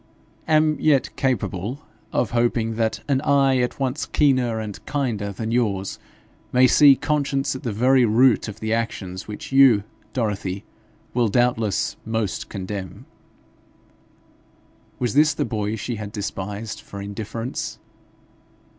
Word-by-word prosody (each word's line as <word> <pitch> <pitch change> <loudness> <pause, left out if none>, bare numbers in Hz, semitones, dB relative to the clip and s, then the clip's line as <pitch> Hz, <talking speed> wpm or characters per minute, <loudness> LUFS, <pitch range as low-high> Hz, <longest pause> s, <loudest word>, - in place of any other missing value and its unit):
' - - -34
am 155 0 +2
yet 140 -5 +2
capable 125 - -2 0.3
of 120 - 0
hoping 115 -1 +1
that 110 0 -1
an 135 -2 +1
eye 135 -2 +3
at 125 +2 -1
once 135 +2 -1
keener 130 -6 +2
and 105 -2 -6
kinder 115 -8 -1
than 110 +3 -4
yours 100 -6 -1 0.5
may 130 +1 +5
see 140 +2 +7
conscience 140 -1 -1
at 130 - -6
the 120 - -3
very 125 +5 +4
root 120 +2 +4
of 105 0 -8
the 110 0 -1
actions 100 -5 -3
which 105 +4 -8
you, 135 -6 +6 0.3
Dorothy, 100 -5 -2 0.5
will 120 -1 +2
doubtless 115 -3 +1
most 110 -3 -2
condemn.' 95 -1 -6 1.9
Was 120 -4 -1
this 150 +1 +4
the - - 0
boy 105 -1 -2
she 115 +1 -4
had 105 -1 -6
despised 105 +1 -5
for 100 - -9
indifference? 110 +4 -5
115 Hz, 135 wpm, -23 LUFS, 105-130 Hz, 1.9 s, see